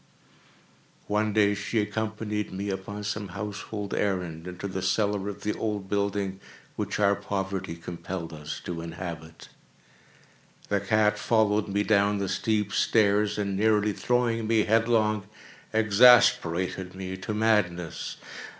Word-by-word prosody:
One 105 +1 0
day 105 -1 +3
she 100 +3 -3
accompanied 105 0 -2
me, 100 +2 -3
upon 100 +2 -5
some 105 0 -3
household 100 +2 -5
errand, 90 -4 -2
into 90 +2 -5
the 95 0 -4
cellar 100 +1 0
of 100 0 -8
the 105 - 0
old 105 -3 -3
building 100 -1 -1 0.4
which - - -3
our 100 -1 +4
poverty 95 -3 -3
compelled 85 0 -6
us 75 -1 -6
to 85 -2 -4
inhabit. 85 -1 -8 1.2
The 100 - +2
cat 105 +1 +2
followed 110 -2 +2
me 100 +1 0
down 105 -1 +3
the 100 -1 -2
steep 105 0 0
stairs, 105 -1 +3
and, 100 -2 -1
nearly 105 0 +2
throwing 115 -1 0
me 110 -1 +3
headlong, 110 -2 +2 0.4
exasperated 100 -5 +4
me 95 0 -5
to 105 +3 -4
madness. 100 -6 0
100 Hz, 130 wpm, -27 LUFS, 95-105 Hz, 1.2 s, our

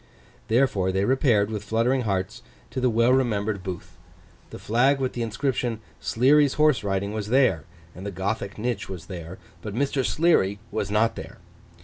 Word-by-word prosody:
Therefore, 110 -6 +2
they 95 +1 0
repaired, 115 -5 +2
with 105 -2 -4
fluttering 115 +5 +1
hearts, 105 +2 -2 0.3
to 130 - -3
the 125 - +3
well 115 +2 +3
remembered 110 -6 0
booth. 90 -2 -7 0.5
The - - -8
flag 125 +6 +2
with 130 -1 -1
the 120 - -4
inscription 115 0 -1 0.2
SLEARY'S 140 +4 +3
HORSE 150 -5 +3
RIDING 100 +1 -1
was 105 -1 -3
there; 120 - +2 0.3
and 90 - -10
the 100 - -3
Gothic 100 +1 -3
niche 115 -1 -3
was 90 -4 -7
there; 85 0 -8 0.2
but 105 +1 -6
Mr. 135 +1 0
Sleary 140 - +2
was 105 -2 -2
not 115 +2 +2
there. - - -9
110 Hz, 165 wpm, -25 LUFS, 100-125 Hz, 0.5 s, the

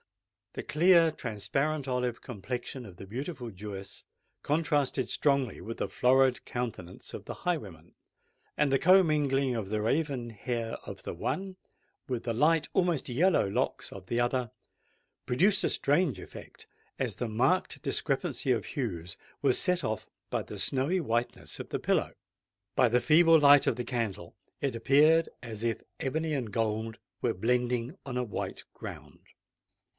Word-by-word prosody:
The - - -5
clear, 170 0 +5
transparent 135 +5 -2
olive 125 -2 -1
complexion 125 +3 -5
of 95 -4 -12
the 95 - -9
beautiful 125 - -5
Jewess 100 0 -8 0.4
contrasted 145 -3 +1
strongly 140 -4 +1
with 115 +1 -6
the - - -1
florid 130 0 +3
countenance 115 -8 -6
of - - -6
the - - -6
highwayman; 100 - -3 0.6
and 150 -1 +3
the 135 0 +3
commingling 150 -8 +4
of 105 -4 -3
the 105 0 -1
raven 125 +1 -1
hair 115 +1 -3
of - - -8
the - - -4
one 190 0 -3 0.5
with 125 -3 -2
the 115 - -1
light, 155 +6 +3
almost 175 -5 +1
yellow 155 - +3
locks 100 - -1
of 95 -1 -10
the 120 - 0
other, 120 -1 0 0.7
produced 190 +11 +3
a - - +2
strange 145 - +1
effect, - - -11 0.3
as - - -1
the 120 - -3
marked 130 +12 +1
discrepancy 130 - 0
of 115 -4 +1
hues 90 - -4 0.3
was - - +3
set 180 0 +2
off 110 0 -3 0.2
by - - 0
the - - -7
snowy 140 +8 +2
whiteness 120 -5 -2
of - - -7
the - - -2
pillow. - - +1 0.6
By 125 - +5
the 120 +2 +3
feeble 165 +5 +6
light 145 -1 +7
of 115 - +2
the 120 - -3
candle, 110 -9 -3 0.2
it 140 -4 -1
appeared 150 +7 +4
as 110 -2 -6
if 115 -2 -1 0.2
ebony 155 +4 -1
and 125 -7 -2
gold 110 +1 -1 0.2
were - - 0
blending 125 - 0
on 125 -2 -4
a 125 - +1
white 110 - -5
ground. - - -9
125 Hz, 155 wpm, -30 LUFS, 115-150 Hz, 0.7 s, light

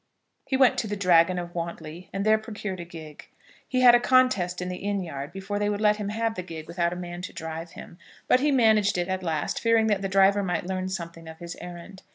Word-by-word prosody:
He 265 - +1
went 260 -2 +4
to 225 - -2
the 205 - -3
Dragon 180 -2 +4
of 175 -1 -5
Wantley, 170 0 -6
and 195 +1 -3
there 215 0 +4
procured 210 -3 -6
a 170 - -6
gig. 160 -3 -11 0.4
He 255 -1 0
had 245 -1 +8
a 240 - +6
contest 245 -9 +2
in 180 - -4
the 180 0 -4
inn 200 -1 -2
yard 140 -3 -6
before 195 +2 -4
they 205 0 0
would 205 -1 -2
let 210 -1 +3
him 205 -1 -4
have 225 +1 -1
the 185 - -5
gig 165 -3 -8
without 170 0 -1
a - - -4
man 175 0 -6
to - - -6
drive 160 +1 -6
him; 170 - -12 0.3
but 250 - +5
he 295 +2 +2
managed 220 -6 +3
it 175 0 -1
at 190 0 -2
last, 160 -4 -2
fearing 230 -1 +3
that 205 -3 +1
the 195 - -2
driver 195 +1 +4
might 180 -2 -2
learn 185 0 -3
something 170 -3 -6
of 160 0 -9
his 170 +1 -8
errand. 175 +2 -10
190 Hz, 245 wpm, -26 LUFS, 170-210 Hz, 0.4 s, had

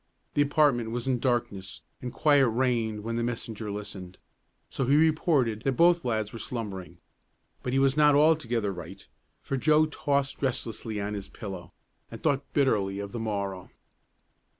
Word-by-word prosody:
The 145 - +2
apartment 145 -5 +3
was 120 +2 -4
in 130 -2 +1
darkness 115 -6 -2 0.2
and 125 - -4
quiet 145 -3 +4
reigned 115 -3 0
when 115 +1 -3
the 120 - 0
messenger 115 -2 -4
listened, 100 -3 -7 0.5
so 135 - -2
he 140 - +4
reported 150 -8 +2
that 135 - 0
both 170 +4 +4
lads 110 -4 -1
were 115 - -6
slumbering. 95 -8 -6 0.6
But 125 - -3
he - - +2
was 135 0 +3
not 150 -1 +5
altogether 125 -9 +2
right, 90 +1 -10 0.4
for 135 - -2
Joe 155 +3 +4
tossed 140 -2 -1
restlessly 115 -5 -2
on 100 +1 -3
his 100 -2 -6
pillow 95 -6 -8 0.4
and - - -9
thought 140 -2 0
bitterly 105 -9 +1
of 100 0 -5
the 120 - -5
morrow. 100 -4 -3
120 Hz, 160 wpm, -28 LUFS, 105-140 Hz, 0.6 s, not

